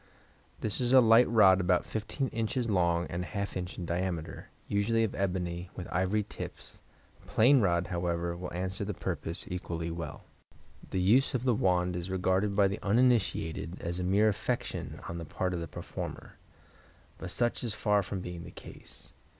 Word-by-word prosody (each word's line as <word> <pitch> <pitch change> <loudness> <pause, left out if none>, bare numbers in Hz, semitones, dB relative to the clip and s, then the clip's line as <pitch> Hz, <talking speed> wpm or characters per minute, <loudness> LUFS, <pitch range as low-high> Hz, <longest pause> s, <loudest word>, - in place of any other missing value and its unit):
—This 110 +3 -1
is 125 +1 +1
a 130 - +10
light 115 0 +6
rod 95 -5 +6
about 90 -1 +2
15 115 +5 -3
in. 115 -1 -1 0.3
long 85 -2 +2
and 85 +1 -2
½ 100 +2 -4
in. 90 -1 -2
in 90 - -4
diameter, 85 -1 -3 0.2
usually 115 +3 +2
of 110 - -1
ebony, 90 -2 -2
with 90 - -6
ivory 95 +4 +1
tips; - - -9 0.4
a - - -20
plain 130 +4 +5
rod, 85 -3 +2
however, 85 -1 -2
will 90 +1 -6
answer 95 +3 -2
the 100 -1 -3
purpose 85 +1 -4
equally 85 -2 -4
well. 80 -2 -6 0.7
The 95 - -1
use 115 +10 +4
of 125 - -1
the 125 -2 +3
wand 90 -3 +1
is 90 +1 -4
regarded 95 +2 +1
by 100 -1 +5
the 100 +2 -4
uninitiated 100 -7 +1
as 85 +1 -3
a - - -1
mere 100 +4 +3
affectation 110 +4 -3
on 85 - -5
the - - -5
part 90 +4 -2
of 90 - -2
the 85 - -4
performer, - - -7 0.8
but 95 - -6
such 120 +7 0
is 115 -3 -2
far 105 -2 +2
from 95 0 -5
being 90 -1 -6
the - - -9
case. - - -13
95 Hz, 180 wpm, -30 LUFS, 85-105 Hz, 0.8 s, a